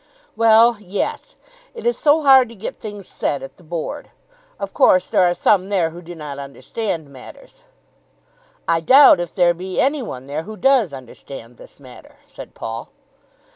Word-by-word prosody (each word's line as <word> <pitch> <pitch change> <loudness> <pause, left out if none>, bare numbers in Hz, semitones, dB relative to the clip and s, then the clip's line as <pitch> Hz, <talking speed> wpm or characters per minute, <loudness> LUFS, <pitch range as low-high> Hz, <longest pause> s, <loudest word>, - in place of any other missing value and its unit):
"Well, 230 +1 +5
yes. 205 - -4 0.4
It 465 - -9
is 480 - +2
so 305 +1 +2
hard 265 -3 +6
to 230 - -13
get 205 - -7
things 205 -3 -9
said 140 - -3
at 135 - -11
the - - -19
Board. 165 0 -6 0.5
Of 200 0 -6
course 185 0 +4
there - - +1
are 175 -1 +3
some 195 0 +2
there 180 -5 0
who 170 +2 -11
do 175 0 -10
not 150 -3 -8
understand 150 - -5
matters." - - -14 1.0
"I 165 - +2
doubt 260 - +7
if 175 -2 -4
there 175 -2 +3
be 185 +2 -5
any 280 +1 +1
one 130 - -7
there 145 +3 -4
who 215 +6 -10
does 260 - +3
understand 125 -2 -11
this - - -15
matter," 130 -3 -15
said - - -12
Paul. 115 +1 -6
185 Hz, 175 wpm, -20 LUFS, 150-230 Hz, 1.0 s, doubt